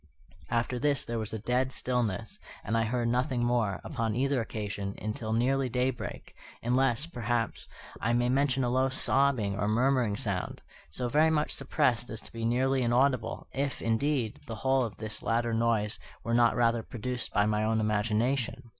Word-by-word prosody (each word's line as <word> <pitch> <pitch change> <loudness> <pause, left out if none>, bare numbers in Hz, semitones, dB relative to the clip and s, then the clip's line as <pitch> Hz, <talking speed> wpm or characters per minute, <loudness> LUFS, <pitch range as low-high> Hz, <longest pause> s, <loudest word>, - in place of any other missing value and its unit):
After 120 +1 0
this 145 0 +2
there 115 -1 -2
was 110 -2 -3
a 110 - -3
dead 125 +4 0
stillness, 125 -7 -2 0.2
and 110 - -1
I 115 0 +2
heard 120 +1 0
nothing 125 +1 +1
more, 115 -5 +1
upon 115 -6 -2
either 135 0 +1
occasion, 100 -3 -4
until 110 +1 -3
nearly 130 +3 +2
daybreak; 125 -1 -3 0.3
unless, 125 +3 +2
perhaps, 120 -7 -2 0.3
I 115 - 0
may 120 0 +2
mention 135 0 +2
a 120 - +1
low 130 +2 +2
sobbing 130 -6 +2
or 100 - +1
murmuring 120 -1 +2
sound, 100 -4 -3 0.3
so 120 - -3
very 150 +5 +4
much 155 -1 +1
suppressed 130 -3 0
as 110 - -3
to - - -10
be 115 0 -3
nearly 130 +3 +2
inaudible, 120 -1 +1
if, 140 0 -2
indeed, 115 0 0
the 115 - -4
whole 130 0 +4
of 115 - -5
this 110 0 -5
latter 115 0 0
noise 115 -2 +1 0.2
were 115 - -2
not 120 0 +4
rather 115 -1 +2
produced 120 +1 -4
by 105 - +3
my 105 0 +1
own 110 +1 +1
imagination. 110 +4 0
120 Hz, 170 wpm, -29 LUFS, 110-130 Hz, 0.3 s, very